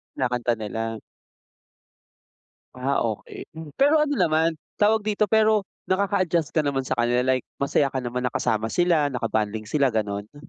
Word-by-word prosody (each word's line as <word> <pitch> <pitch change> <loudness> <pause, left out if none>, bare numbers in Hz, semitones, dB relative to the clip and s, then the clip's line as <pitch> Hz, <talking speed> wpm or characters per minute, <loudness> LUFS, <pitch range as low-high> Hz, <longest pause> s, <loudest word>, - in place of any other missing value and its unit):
Kinakanta 125 -2 0
nila? 115 +1 -4 1.8
Ah, 130 +2 -1
okey. 110 -2 -5
Mm, 160 -1 -9
pero 290 +3 +4
ano 290 -1 +1
naman, 160 0 +2 0.2
tawag 210 0 +3
dito? 215 0 +1
Pero 215 -2 +3 0.2
nakaka-adjust 185 -4 +1
ka 155 -2 +2
naman 135 -1 0
sa 130 - -3
kanila 120 +1 +2
like 130 - -5 0.2
masaya 140 0 +2
ka 130 - -1
naman 125 +1 -3
na 125 - -2
kasama 110 0 0
sila, 175 -4 +3
na 125 - -4
ka-bonding 110 -1 -1
sila, 140 -5 +2
gano'n? 105 +3 -3
140 Hz, 155 wpm, -24 LUFS, 115-180 Hz, 1.8 s, pero